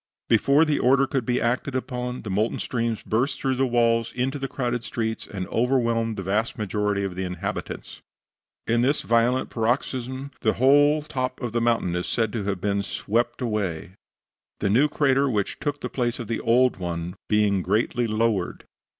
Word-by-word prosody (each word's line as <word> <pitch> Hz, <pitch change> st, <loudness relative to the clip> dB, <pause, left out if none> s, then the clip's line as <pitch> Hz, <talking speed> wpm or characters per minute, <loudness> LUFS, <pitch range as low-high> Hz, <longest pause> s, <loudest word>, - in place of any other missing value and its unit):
Before 140 Hz, +7 st, +4 dB
the 150 Hz, -2 st, +1 dB
order 135 Hz, +2 st, +4 dB
could 135 Hz, -4 st, -2 dB
be 125 Hz, 0 st, +2 dB
acted 125 Hz, +3 st, -1 dB
upon 125 Hz, -1 st, -3 dB
the 105 Hz, -, -5 dB
molten 105 Hz, +4 st, 0 dB
streams 115 Hz, -2 st, -2 dB
burst 135 Hz, +5 st, 0 dB
through 135 Hz, -, 0 dB
the 130 Hz, +1 st, +1 dB
walls 115 Hz, -1 st, +2 dB
into 135 Hz, +3 st, -1 dB
the 135 Hz, -, -2 dB
crowded 120 Hz, -3 st, -2 dB
streets, 110 Hz, 0 st, -3 dB
and 95 Hz, -3 st, -5 dB
overwhelmed 115 Hz, -2 st, +1 dB
the 95 Hz, -, -3 dB
vast 110 Hz, +8 st, -1 dB
majority 105 Hz, -1 st, -1 dB
of 95 Hz, -2 st, -3 dB
the 95 Hz, +1 st, -4 dB
inhabitants. 90 Hz, -2 st, -5 dB, 0.6 s
In 115 Hz, +1 st, +2 dB
this 140 Hz, +4 st, +1 dB
violent 120 Hz, +2 st, +2 dB
paroxysm 130 Hz, +3 st, -2 dB
the 110 Hz, -, +2 dB
whole 145 Hz, +4 st, +4 dB
top 130 Hz, -4 st, -3 dB
of 120 Hz, -3 st, -3 dB
the 120 Hz, +1 st, 0 dB
mountain 115 Hz, -7 st, +1 dB
is 90 Hz, -, -2 dB
said 110 Hz, -3 st, 0 dB
to 110 Hz, -4 st, -2 dB
have 100 Hz, -2 st, -1 dB
been 100 Hz, +1 st, 0 dB
swept 120 Hz, +6 st, -1 dB
away, 100 Hz, -8 st, -2 dB, 0.7 s
the 100 Hz, -, +1 dB
new 130 Hz, +8 st, +5 dB
crater 140 Hz, -1 st, +2 dB
which 105 Hz, -5 st, -1 dB
took 145 Hz, -1 st, -3 dB
the -, -, -2 dB
place 120 Hz, -2 st, -1 dB
of 120 Hz, -, -6 dB
the 115 Hz, -, -2 dB
old 125 Hz, +1 st, +3 dB
one 85 Hz, -1 st, -4 dB
being 105 Hz, -2 st, +3 dB
greatly 110 Hz, +5 st, 0 dB
lowered. 110 Hz, -4 st, 0 dB
115 Hz, 180 wpm, -25 LUFS, 105-130 Hz, 0.7 s, new